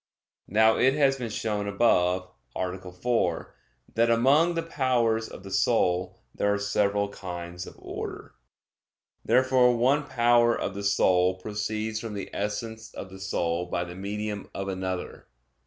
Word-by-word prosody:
Now 110 +2 +4
it 130 +2 +4
has 135 -2 +3
been 120 -3 -4
shown 105 -1 -2
above 90 -4 +2 0.3
(A. 90 0 -4
4) 115 +7 -1 0.4
that 115 +1 +3
among 140 +9 +4
the 165 - -1
powers 125 -8 +1
of - - -11
the 95 - -9
soul 95 -3 +1 0.2
there 100 - +1
are 100 - +1
several 100 0 +1
kinds 90 -2 -7
of - - -11
order. - - -7 0.9
Therefore 125 0 +4
one 140 +5 +2
power 120 -2 +3
of 95 - -2
the 100 +1 -6
soul 95 -2 +3
proceeds 105 +3 -3
from 115 -2 -6
the 100 - -6
essence 110 +2 -4
of 95 - -7
the 95 - -10
soul 90 -2 -1
by 90 0 -1
the 85 0 -8
medium 105 +2 -4
of 95 0 -3
another. 95 -1 -4
105 Hz, 150 wpm, -27 LUFS, 95-120 Hz, 0.9 s, Now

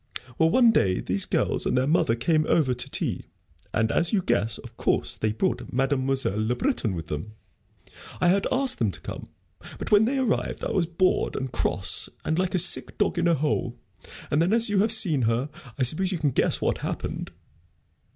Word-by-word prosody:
Well, 160 - +4
one 240 +4 +5
day 95 - +2
these 95 +2 0
girls - - 0
and - - +1
their 130 - +2
mother 145 -6 +2
came 155 +6 +1
over 140 -6 +2
to 125 - -4
tea, - - -3 0.4
and, 110 +1 0
as 170 - +1
you 195 -4 +1
guess, 115 -4 0
of - - -12
course, - - -1
they 110 - -1
brought 180 - -2
Mademoiselle 135 -5 0
Le 120 +3 0
Breton 135 - -1
with 80 -2 -5
them. 80 +8 -6 0.9
I 175 - +3
had 195 +2 +2
asked 260 0 0
them 115 - +2
to - - -10
come, - - -8 0.5
but - - -6
when 210 +1 +6
they 270 +4 0
arrived 255 -4 -1
I - - -2
was 175 -4 +1
bored 185 +2 0
and 130 -1 -4
cross, - - +1 0.2
and 160 +2 0
like 185 0 0
a - - +3
sick 180 +1 +2
dog 175 - 0
in 170 - +2
a 170 - +3
hole. 135 -4 -2 0.5
And 150 - +2
then, 180 +5 +2
as 230 -2 +3
you 200 - +2
have 215 +3 +3
seen 185 - +2
her, 120 +5 -1 0.3
I 135 - +1
suppose 180 +9 +2
you 185 - -1
can 150 -3 0
guess - - +1
what - - 0
happened." - - -4
155 Hz, 205 wpm, -25 LUFS, 120-190 Hz, 0.9 s, when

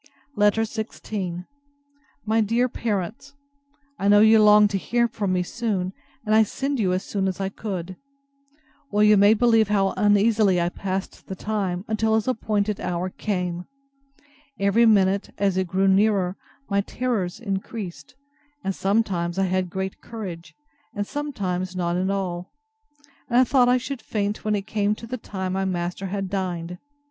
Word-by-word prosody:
LETTER 210 +2 +3
XVI 210 -5 -5 0.8
MY 220 +1 +2
DEAR 230 +4 +2
PARENTS, 225 +4 -4 0.6
I 200 - 0
know 205 0 +7
you 220 +1 +6
longed 210 0 +6
to 195 - 0
hear 235 +4 +1
from 210 -4 -2
me 180 -1 +1
soon; 195 -3 -2 0.3
and 215 - +1
I 220 - +7
send 270 +5 -1
you 190 -4 +2
as 185 +1 -1
soon 195 -2 -2
as 190 0 -3
I 195 0 -1
could. 185 -3 -5 0.9
Well, 210 0 +2
you 210 0 +7
may 205 +2 +6
believe 225 -1 +4
how 195 -2 +1
uneasily 205 -1 +3
I 170 0 +1
passed 190 +1 -5
the 190 - -5
time, 190 -3 -2
till 220 0 +2
his 220 +1 0
appointed 210 -4 0
hour 180 +1 -2
came. 180 -4 -3 0.9
Every 200 +4 +4
minute, 195 -2 +3
as 195 -2 +1
it 190 -1 0
grew 190 +3 +1
nearer, 195 -2 +3 0.3
my 200 -1 +1
terrors 210 -5 -2
increased; 200 -1 -5 0.5
and 195 - -1
sometimes 190 -4 0
I 195 - +2
had 185 -1 0
great 190 +1 -4
courage, 175 -8 -8 0.4
and 205 0 -1
sometimes 185 -11 -3
none 175 -1 -1
at 185 +1 0
all; 180 -2 -3 0.8
and 240 - +2
I 255 - +7
thought 250 -1 +3
I 250 - +5
should 260 0 -5
faint 210 -1 -2
when 215 -1 +1
it 200 -1 -3
came 210 -1 0
to 230 - -10
the 250 +3 -5
time 190 -3 -4
my 195 0 0
master 180 +1 -3
had 195 0 -3
dined. 180 -2 -3
200 Hz, 165 wpm, -24 LUFS, 185-220 Hz, 0.9 s, know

